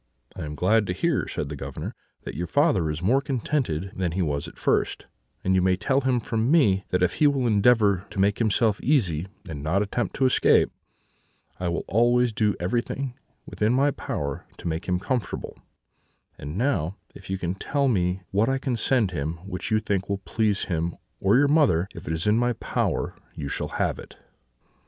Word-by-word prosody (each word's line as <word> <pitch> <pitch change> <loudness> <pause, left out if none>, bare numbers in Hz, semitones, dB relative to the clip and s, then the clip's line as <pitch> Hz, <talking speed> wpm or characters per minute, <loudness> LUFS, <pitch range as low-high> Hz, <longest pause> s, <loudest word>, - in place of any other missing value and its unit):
"'I - - -5
am 75 0 -6
glad 105 +6 +2
to 90 - -1
hear,' 165 - 0
said 70 - -4
the 75 - -5
Governor, - - -6 0.3
'that - - -6
your 85 +4 -3
father 80 0 +2
is 75 +3 -4
more 130 +8 +3
contented 125 - -1
than 90 -3 -1
he 95 +1 0
was 70 -3 -2
at - - -12
first; - - 0 0.4
and 95 - +2
you 95 - +4
may 95 0 +3
tell 135 +8 +1
him 130 -2 +2
from 115 +1 -1
me, 105 - +4
that 90 0 +1
if 90 - +1
he 150 - +6
will 140 -3 +1
endeavour 105 -3 +4
to 105 - -6
make 100 +2 +2
himself 110 -1 +2
easy, 95 - +1 0.2
and 75 -5 -6
not 85 +7 +1
attempt 115 +4 -2
to 135 - +2
escape, 130 - +4 0.9
I 90 - -2
will 85 - -2
always 120 +2 +3
do 105 -1 +1
everything 120 +7 -2 0.5
in 110 +3 +4
my 140 +2 +3
power 70 - -4
to - - -6
make 80 +1 -3
him 90 -1 +1
comfortable; 120 +1 -3 0.8
and 75 +5 -7
now, 105 - 0 0.2
if 95 - -13
you 95 - -1
can 90 -1 -2
tell 140 +8 0
me 90 -5 +1
what 105 +5 +2
I 135 - +1
can 130 -2 -2
send 115 -5 +2
him 75 -1 -2
which 90 -2 -5
you 110 - +3
think 100 -2 -2
will 100 - 0
please 105 -3 0
him 85 -1 -2 0.2
or 100 +5 +4
your 145 +2 +5
mother, 140 - +3
if - - -10 0.2
in 105 +2 +3
my 120 0 +2
power - - -1 0.2
you 70 - -5
shall - - -2
have - - 0
it.' - - -11
100 Hz, 195 wpm, -25 LUFS, 90-125 Hz, 0.9 s, he